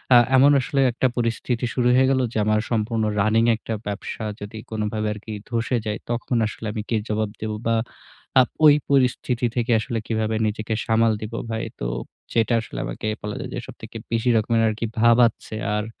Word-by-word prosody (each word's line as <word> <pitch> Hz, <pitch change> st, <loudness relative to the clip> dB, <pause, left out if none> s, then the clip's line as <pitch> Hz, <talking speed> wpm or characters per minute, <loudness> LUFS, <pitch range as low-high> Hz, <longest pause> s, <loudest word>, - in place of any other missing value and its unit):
আ -, -, +10 dB, 0.2 s
এমন 140 Hz, +2 st, +7 dB
আসলে 135 Hz, +1 st, 0 dB
একটা 125 Hz, +2 st, +1 dB
পরিস্থিতি 120 Hz, +1 st, -1 dB
শুরু 125 Hz, -2 st, +2 dB
হয়ে 130 Hz, +1 st, +4 dB
গেল 135 Hz, -, +2 dB
যে -, -, -2 dB
আমার 110 Hz, 0 st, +2 dB
সম্পূর্ণ 110 Hz, 0 st, 0 dB, 0.2 s
রানিং 110 Hz, +2 st, +3 dB
একটা 115 Hz, -, -5 dB
ব্যবসা 105 Hz, +2 st, -4 dB, 0.2 s
যদি 105 Hz, +2 st, -7 dB
কোনভাবে 110 Hz, 0 st, -2 dB
আরকি 105 Hz, +1 st, -9 dB, 0.2 s
ধসে 120 Hz, +1 st, 0 dB
যায়, 105 Hz, 0 st, -2 dB
তখন 120 Hz, +1 st, -1 dB
আসলে 110 Hz, -, -8 dB
আমি 110 Hz, -, -3 dB
কী 115 Hz, -, +1 dB
জবাব 110 Hz, 0 st, 0 dB
দেব? 110 Hz, 0 st, -2 dB, 0.2 s
বা 115 Hz, -, +3 dB, 0.6 s
আ -, -, +9 dB, 0.2 s
ওই 145 Hz, -1 st, +9 dB, 0.2 s
পরিস্থিতি 125 Hz, -2 st, +2 dB
থেকে 120 Hz, -1 st, 0 dB
আসলে 115 Hz, +2 st, -3 dB
কীভাবে 110 Hz, -1 st, 0 dB
নিজেকে 110 Hz, +1 st, -3 dB
সামাল 115 Hz, 0 st, +3 dB
দিব 110 Hz, +1 st, -6 dB, 0.2 s
ভাই? 110 Hz, 0 st, -2 dB, 0.2 s
তো -, -, -3 dB, 0.5 s
যেটা 115 Hz, +1 st, +2 dB
আসলে 110 Hz, -, -7 dB
আমাকে -, -, -5 dB, 0.2 s
বলা 105 Hz, 0 st, -4 dB
যায় -, -, -6 dB
যে -, -, -2 dB
সবথেকে -, -, -9 dB
বেশি 115 Hz, +1 st, +1 dB
রকমের 115 Hz, +1 st, +2 dB
আরকি 110 Hz, +2 st, -3 dB
ভাবাচ্ছে। 115 Hz, -1 st, +3 dB, 0.2 s
আর 105 Hz, 0 st, -1 dB
115 Hz, 185 wpm, -23 LUFS, 110-120 Hz, 0.6 s, আ